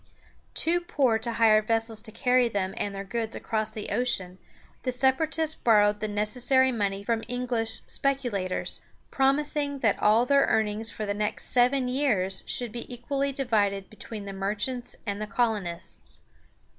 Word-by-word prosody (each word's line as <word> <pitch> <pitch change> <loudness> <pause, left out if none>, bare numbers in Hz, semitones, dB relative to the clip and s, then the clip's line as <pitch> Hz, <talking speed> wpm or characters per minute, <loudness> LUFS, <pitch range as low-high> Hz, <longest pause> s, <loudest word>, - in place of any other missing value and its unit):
Too 340 +2 +3
poor 265 -10 +1
to 230 +1 -3
hire 220 -2 +5
vessels 225 0 -1
to 220 -1 -5
carry 250 +1 +2
them 195 -3 -2
and 200 -1 -3
their 195 - -4
goods 225 +3 -3
across 220 -1 -2
the 215 -1 -6
ocean, 190 -7 -1 0.4
the 255 - -1
Separatists 305 +5 +1
borrowed 210 -5 +3
the 215 - -2
necessary 245 +6 +2
money 200 -4 -1
from 225 +1 -1
English 240 -2 -1
speculators, 245 -10 -1 0.3
promising 285 +1 +1
that 220 -4 +2
all 220 +3 +4
their 280 +1 +4
earnings 220 0 0
for 215 - -5
the 205 - -1
next 210 0 -2
seven 250 +1 +3
years 220 -8 0
should 245 -3 -1
be 235 +2 -7
equally 275 +3 -2
divided 210 -7 0
between 215 -1 -8
the 195 - -6
merchants 210 +6 -2
and 205 -1 -3
the 215 - -3
colonists. 210 -8 -2
225 Hz, 155 wpm, -27 LUFS, 210-255 Hz, 0.4 s, hire